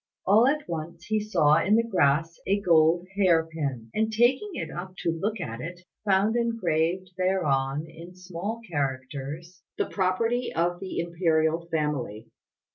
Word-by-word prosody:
All 215 +6 +5
at 300 +2 0
once 170 +1 -6
he 215 0 +1
saw 165 -7 +3
in 210 - +4
the 230 - +4
grass 165 -4 +2
a 200 +1 +2
gold 170 -1 +4
hair 175 -5 +4
pin; 140 -8 -4
and 220 +1 0
taking 245 - +3
it - - -4
up 185 +1 -7
to 170 - +2
look 200 +6 -2
at 115 -8 -5
it, 175 +3 -7 0.2
found 200 +3 +3
engraved 185 -6 0
thereon 150 -6 +1
in 165 +3 -12
small 185 +5 -5
characters 145 +3 -4 0.2
"The - - +1
property 225 +6 0
of 175 +1 0
the 190 0 -6
Imperial 165 -1 +1
family." 145 -9 -3
170 Hz, 150 wpm, -26 LUFS, 155-195 Hz, 0.2 s, All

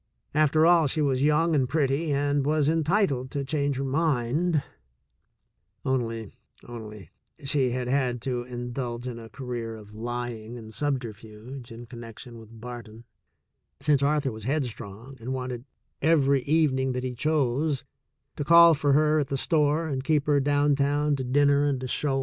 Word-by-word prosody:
After 155 +1 +4
all, 170 -2 +5
she 150 - -2
was 135 -3 +1
young 150 +3 +3
and 130 -4 +2
pretty 150 +1 +1
and 145 0 +1
was 150 0 +2
entitled 160 -4 +1
to 140 0 -3
change 140 -1 0
her 135 - -2
mind; 150 +2 +1 1.2
only, 115 -5 -2 0.3
only 110 -7 -9
— - - -26
she 135 -2 +1
had 125 0 -2
had 125 -2 0
to 125 -2 -1
in 120 0 -6
dulge 120 -2 -4
in 120 -2 -5
a 115 -1 -10
career 120 -1 -5
of 105 -1 -13
lying 120 0 -5
and 110 -1 -10
subterfuge 120 -2 -5
in 115 +1 -9
connec 115 -2 -10
tion 120 -3 -10
with 110 0 -14
Barton, 115 -1 -9 0.8
since 140 0 +2
Arthur 145 -1 +1
was 110 -1 -9
headstrong 125 -3 -4
and 125 +3 -4
wanted 125 -1 -5 0.4
every 140 -3 +3
evening 135 -4 +2
that 125 0 -3
he 130 -1 -3
chose 140 0 0 0.3
— - - -53
to - - -1
call 170 +2 +8
for 145 -2 +2
her 155 +1 +4
at 145 - -1
the 135 - -2
store 155 +1 +1
and 135 -3 -3
keep 150 -1 +1
her 145 -1 +3
down 145 +1 +2
town 145 +1 +1
to 130 - -3
dinner 140 +2 +3
and 135 -3 -1
a - - -3
show. 135 +1 0
135 Hz, 175 wpm, -26 LUFS, 120-145 Hz, 1.2 s, call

